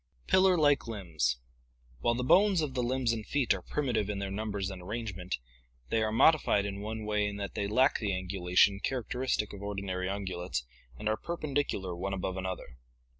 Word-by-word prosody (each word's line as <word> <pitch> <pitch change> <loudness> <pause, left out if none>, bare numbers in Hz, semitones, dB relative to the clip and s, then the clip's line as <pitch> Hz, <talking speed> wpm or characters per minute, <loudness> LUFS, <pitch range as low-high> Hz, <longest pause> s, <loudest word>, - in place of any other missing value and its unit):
Pillar 185 -1 +5
like 145 -5 +3
Limbs. 80 - -1 0.3
— - - -32
While 120 - +2
the 125 - -1
bones 190 +6 +5
of 145 -4 -2
the 125 - 0
limbs 125 -1 +1
and 110 -1 -3
feet 135 +1 +2
are 95 - -5
primitive 120 -4 -1
in 105 - -2
their 100 -1 -3
numbers 100 -2 -2
and 95 -1 -8
arrangement, 95 -2 -4 0.5
they 115 - +2
are 110 0 +1
modified 115 -4 +4
in 100 0 -4
one 110 +1 -4
way 105 -1 +1
in 100 - -4
that 100 -1 -4
they 100 - -1
lack 130 +7 +3
the 105 - -1
angulation 95 +1 +2
characteristic 125 -3 -1
of 100 - -8
ordinary 100 -2 -3
ungulates 95 -8 -3 0.3
and 105 - -4
are 110 0 +2
perpendicular 145 - -2
one 95 +3 -3
above 95 0 -3
another. 95 -9 -5
105 Hz, 185 wpm, -31 LUFS, 95-125 Hz, 0.5 s, Pillar